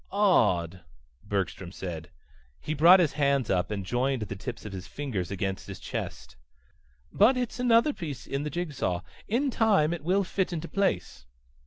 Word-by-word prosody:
"Odd," 95 - +2 0.4
Bergstrom 95 -3 -3
said. 85 -4 -6 0.5
He 155 - -3
brought 170 +5 +7
his 165 -5 +3
hands 140 -5 +1
up 90 -2 +1
and 100 -3 -3
joined 125 +2 0
the 100 -1 -5
tips 115 +5 -7
of 105 - -6
his 95 -2 -7
fingers 120 -12 -4
against 95 -1 -3
his - - -7
chest. - - -6 0.8
"But 235 +6 +5
it's 245 0 -3
another 245 +4 +4
piece 150 - -6
in 140 - -3
the 150 - -3
jig 170 -1 -3
saw. 90 -9 -1 0.3
In 260 +6 +1
time 200 -10 +3
it 170 - -6
will 190 +4 +2
fit 190 0 -1
into 170 -1 -4
place." 190 - -1
140 Hz, 170 wpm, -28 LUFS, -, 0.8 s, brought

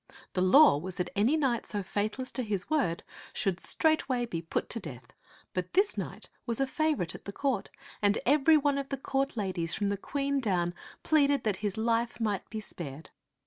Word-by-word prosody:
The 180 - 0
law 185 - +7
was 185 +3 -6
that 180 -1 -3
any 230 +10 +3
knight 260 -6 0
so 205 -2 -3
faithless 215 +7 -2
to 255 - -1
his 205 - -3
word 255 - +1 0.3
should 190 -3 0
straightway 275 - +2
be 170 -8 -4
put 165 - -2
to 230 - -1
death; 140 - -10 0.4
but 180 -1 -3
this 395 +3 +3
knight - - -6 0.2
was 230 -2 -1
a 270 - +3
favorite 295 - 0
at - - -11
the 200 - -5
court, 260 -2 -1 0.3
and 205 0 +3
every 300 +4 +5
one 285 -1 +1
of 275 -1 -5
the 275 - -2
court 270 0 -1
ladies, 185 -5 -1
from 205 -1 0
the 200 - -1
Queen 280 +6 -1
down, 180 -7 0 0.3
pleaded 285 -3 +3
that 210 -4 0
his 205 -1 -3
life 230 +2 0
might 210 -4 -1
be 220 - -4
spared. 160 -7 -7
225 Hz, 195 wpm, -30 LUFS, 185-275 Hz, 0.4 s, law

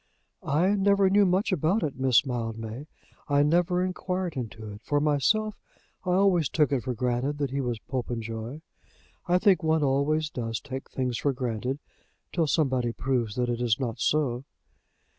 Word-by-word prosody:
"I 160 +7 +2
never 200 -1 +3
knew 200 0 +5
much 190 +5 +1
about 185 +5 +1
it, 145 -3 -2
Miss 130 -1 +3
Mildmay. 115 +1 -4 0.4
I 145 0 +3
never 175 +4 +2
inquired 185 -2 -3
into 110 -4 -6
it. 105 +1 -10
For 145 +2 0
myself, 195 +9 +1 0.4
I 180 - 0
always 185 -5 +3
took 150 -3 +2
it 135 -3 +1
for 125 0 -3
granted 125 +4 -1
that 140 -3 -2
he 140 +1 -1
was 120 -3 -2
Popenjoy. 115 +1 -4 0.7
I 180 +1 +4
think 185 -2 +4
one 160 -1 +2
always 150 +3 +1
does 115 -2 -3
take 135 0 -7
things 125 -2 -2
for 140 - +1
granted 125 +1 -2 0.6
till 165 -3 +1
somebody 130 -6 +1
proves 120 -4 -1
that 125 -1 0
it 120 0 -2
is 120 -1 +1
not 120 -4 -3
so." 135 -5 +1
140 Hz, 165 wpm, -27 LUFS, 120-170 Hz, 0.7 s, knew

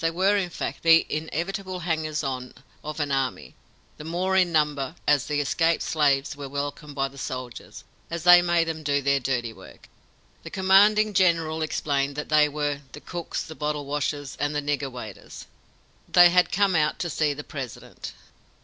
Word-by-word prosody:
They 165 - +2
were, 190 +5 +2
in 190 -3 0
fact, - - -5
the 165 0 +6
inevitable 180 +4 -4
hangers 160 -3 -2
on 130 -2 -4 0.3
of 150 +1 -6
an 145 -1 -1
army, 135 -1 -2 0.4
the - - -9
more 180 +4 -1
in 180 -2 +3
number, 150 -2 0
as 145 -2 +3
the 150 -1 0
escaped 165 +3 +1
slaves 145 -3 +1
were 140 -1 -7
welcomed 145 +1 -5
by 135 -1 0
the 135 0 -13
soldiers, 130 -2 -7 0.3
as 170 -1 -4
they 175 0 +9
made 175 -1 +2
them 160 -1 -4
do 145 -2 0
their 140 0 +2
dirty 120 -3 -2
work. - - -15 0.5
The - - -9
commanding 205 +3 +4
general 165 -4 +2
explained 140 -3 -1
that 150 - -5
they 150 -1 +4
were 145 -1 -2
"the - - -8
cooks, 175 +2 -5
the 160 - -9
bottle 150 -1 -3
washers, 145 0 -3
and 145 0 -1
the - - +1
nigger 145 -2 -2
waiters." 110 -5 -9 0.7
They 175 -1 +8
had 180 0 +3
come 200 -2 +2
out 150 -1 +1
to 175 - -3
see 150 -2 0
the 150 - -7
President. 135 -6 -8
150 Hz, 180 wpm, -25 LUFS, 140-170 Hz, 0.7 s, they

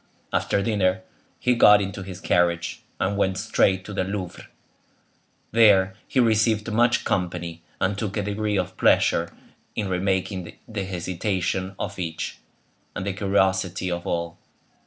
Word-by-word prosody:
After 100 - +1
dinner, 95 -4 +1 0.3
he 125 - +2
got 105 -3 +7
into 100 0 -4
his 95 -1 -8
carriage, 85 -3 +1 0.2
and 100 +2 0
went 95 -1 +1
straight 95 0 +1
to 105 - -7
the 95 - 0
Louvre. 95 -2 -5 1.0
There 100 -4 +5
he 130 - 0
received 110 -1 +2
much 120 +2 +3
company, 85 -2 -2 0.2
and 95 +2 +1
took 105 0 -3
a 105 - 0
degree 105 +1 -1
of 90 0 -2
pleasure 85 0 +3 0.4
in 105 -3 -2
remarking 95 -1 -1
the 105 -3 -4
hesitation 95 +1 -2
of 100 -1 -5
each, 80 -2 -4 0.6
and 90 - -4
the 100 - -1
curiosity 95 -2 +1
of 85 0 -4
all. 85 0 -3
95 Hz, 140 wpm, -24 LUFS, 90-105 Hz, 1.0 s, got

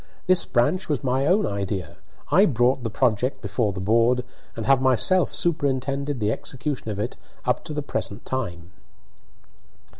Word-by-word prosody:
This 185 -1 +4
branch 145 +11 +1
was 145 -3 -1
my 130 +2 +1
own 195 +4 +3
idea. 95 -4 -3 0.3
I 195 +4 +6
brought 125 - +2
the 115 - -2
project 125 +2 0
before 110 -5 -1
the 95 - -6
board, 115 +5 +2 0.3
and 115 - -4
have 135 -1 +4
myself 135 +8 +3
superintended 140 -3 -1
the 105 -1 +1
execution 135 0 -4
of 105 - -3
it 105 +4 -3 0.3
up - - 0
to - - -6
the 150 - -2
present 110 -5 -4
time." 90 -10 -4
125 Hz, 155 wpm, -24 LUFS, 110-140 Hz, 0.3 s, I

